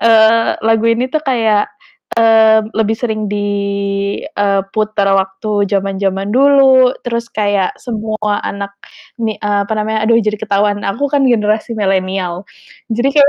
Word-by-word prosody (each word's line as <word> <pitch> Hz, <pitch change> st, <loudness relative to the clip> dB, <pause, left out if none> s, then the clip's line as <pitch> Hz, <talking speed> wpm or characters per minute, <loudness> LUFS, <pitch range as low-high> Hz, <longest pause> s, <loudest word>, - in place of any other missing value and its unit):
eee, 225 Hz, 0 st, +4 dB
lagu 225 Hz, 0 st, +2 dB
ini 230 Hz, +2 st, +1 dB
tuh 310 Hz, -, +1 dB
kayak, 225 Hz, -6 st, +1 dB, 0.5 s
eee, 220 Hz, -1 st, +5 dB, 0.2 s
lebih 220 Hz, 0 st, +1 dB
sering 220 Hz, -2 st, -3 dB
di 205 Hz, 0 st, -2 dB, 0.8 s
eee, 200 Hz, -1 st, 0 dB
puter 215 Hz, -2 st, 0 dB
waktu 195 Hz, +2 st, -1 dB
zaman-zaman 195 Hz, 0 st, -1 dB
dulu, 265 Hz, -1 st, +5 dB
terus 235 Hz, -1 st, -3 dB
kayak 205 Hz, -3 st, 0 dB
semua 215 Hz, -3 st, -3 dB
anak 200 Hz, 0 st, -5 dB, 0.5 s
mi 220 Hz, -2 st, -2 dB
eee, 205 Hz, -1 st, 0 dB
apa 200 Hz, -, -5 dB
namanya, 215 Hz, 0 st, -1 dB
aduh 230 Hz, 0 st, +4 dB
jadi 215 Hz, -1 st, -1 dB
ketahuan 205 Hz, 0 st, 0 dB
aku 275 Hz, +9 st, -1 dB
kan 285 Hz, -1 st, +2 dB
generasi 215 Hz, -1 st, 0 dB
milenial, 190 Hz, -2 st, -1 dB, 0.5 s
jadi 240 Hz, +4 st, +1 dB
kayak 285 Hz, -1 st, +7 dB
215 Hz, 140 wpm, -15 LUFS, 200-230 Hz, 0.8 s, kayak